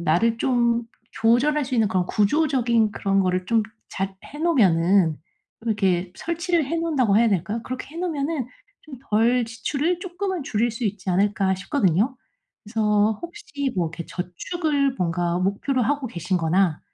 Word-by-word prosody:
나를 175 Hz, +8 st, +2 dB
좀 235 Hz, -2 st, +2 dB, 0.3 s
조절할 270 Hz, +6 st, +2 dB
수 255 Hz, -1 st, -4 dB
있는 225 Hz, -3 st, +3 dB
그런 185 Hz, -1 st, +1 dB
구조적인 235 Hz, -2 st, +2 dB
그런 195 Hz, -1 st, 0 dB
거를 185 Hz, -1 st, 0 dB
좀 225 Hz, 0 st, +3 dB, 0.3 s
잘 195 Hz, 0 st, -3 dB
해 295 Hz, -, -10 dB
놓으면은 190 Hz, -, +3 dB, 0.5 s
이렇게 190 Hz, -5 st, 0 dB
설치를 340 Hz, -1 st, 0 dB
해 330 Hz, -, -2 dB
놓는다고 280 Hz, -11 st, +2 dB
해야 230 Hz, 0 st, +5 dB
될까요? 205 Hz, +4 st, -1 dB
그렇게 255 Hz, +1 st, -6 dB
해 -, -, -8 dB
놓으면은 310 Hz, -5 st, -2 dB, 0.4 s
좀 310 Hz, -, -10 dB, 0.2 s
덜 235 Hz, +3 st, +3 dB
지출을 285 Hz, +9 st, -2 dB
쪼끔은 370 Hz, -2 st, -3 dB
줄일 235 Hz, -1 st, 0 dB
수 230 Hz, +1 st, -4 dB
있지 205 Hz, -2 st, -3 dB
않을까 195 Hz, 0 st, +2 dB
싶거든요. 205 Hz, -, +1 dB, 0.5 s
그래서 210 Hz, -1 st, +1 dB
혹시 335 Hz, -, -5 dB
뭐 175 Hz, -2 st, +1 dB
이렇게 170 Hz, +1 st, -7 dB
저축을 280 Hz, -, -1 dB
뭔가 175 Hz, 0 st, 0 dB
목표로 200 Hz, +8 st, 0 dB
하고 280 Hz, +3 st, 0 dB
계신 175 Hz, -3 st, -2 dB
거나 170 Hz, 0 st, +1 dB
225 Hz, 330 characters per minute, -23 LUFS, 190-280 Hz, 0.5 s, 해야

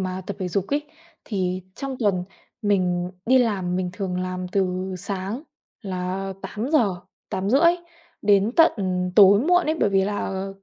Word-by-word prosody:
mà 185 Hz, 0 st, -3 dB
tập 200 Hz, -, -5 dB
thể 180 Hz, -, -1 dB
dục 195 Hz, +1 st, -1 dB
ấy 290 Hz, +1 st, 0 dB, 0.4 s
thì 185 Hz, -3 st, -2 dB
trong 270 Hz, -1 st, -4 dB
tuần 195 Hz, -6 st, +1 dB, 0.4 s
mình 180 Hz, -3 st, +1 dB, 0.2 s
đi 260 Hz, +1 st, +5 dB
làm 190 Hz, -7 st, 0 dB
mình 180 Hz, -1 st, -1 dB
thường 185 Hz, -2 st, -3 dB
làm 185 Hz, 0 st, -4 dB
từ 185 Hz, 0 st, -1 dB
sáng 200 Hz, -, -4 dB, 0.4 s
là 190 Hz, 0 st, -3 dB
8:00, 215 Hz, -, 0 dB, 0.3 s
8:30 255 Hz, -, +3 dB, 0.5 s
đến 205 Hz, +2 st, +3 dB
tận 330 Hz, 0 st, +7 dB, 0.5 s
tối 200 Hz, 0 st, +8 dB
muộn 355 Hz, +4 st, +3 dB
ấy 315 Hz, -, +1 dB
bởi 205 Hz, -, +3 dB
vì 195 Hz, -1 st, +3 dB
là 195 Hz, -1 st, -3 dB
195 Hz, 150 wpm, -23 LUFS, 185-215 Hz, 0.5 s, tối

